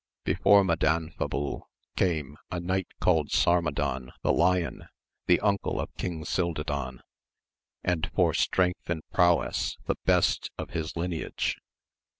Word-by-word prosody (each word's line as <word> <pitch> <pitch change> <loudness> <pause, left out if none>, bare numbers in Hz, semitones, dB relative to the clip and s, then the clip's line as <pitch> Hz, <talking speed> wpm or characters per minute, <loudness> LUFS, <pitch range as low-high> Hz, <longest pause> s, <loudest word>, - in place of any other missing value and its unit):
Before 100 -1 +5
Madanfabul 80 -4 -1 0.3
came 75 -6 0
a 90 - -3
knight 95 +1 -1
called 80 -5 +2
Sarmadan 70 -7 +1
the - - +3
Lion, 90 0 +1 0.4
the 90 - +5
uncle 100 -1 0
of - - -4
King 85 -4 -4
Cildadan, 70 -7 -2 0.8
and 90 -3 0
for - - +3
strength 90 -1 +1
and 80 -2 -2
prowess 85 -1 +2
the - - -1
best - - +2
of - - -6
his 80 -2 -3
lineage. 85 -1 -2
85 Hz, 120 wpm, -28 LUFS, 75-90 Hz, 0.8 s, Before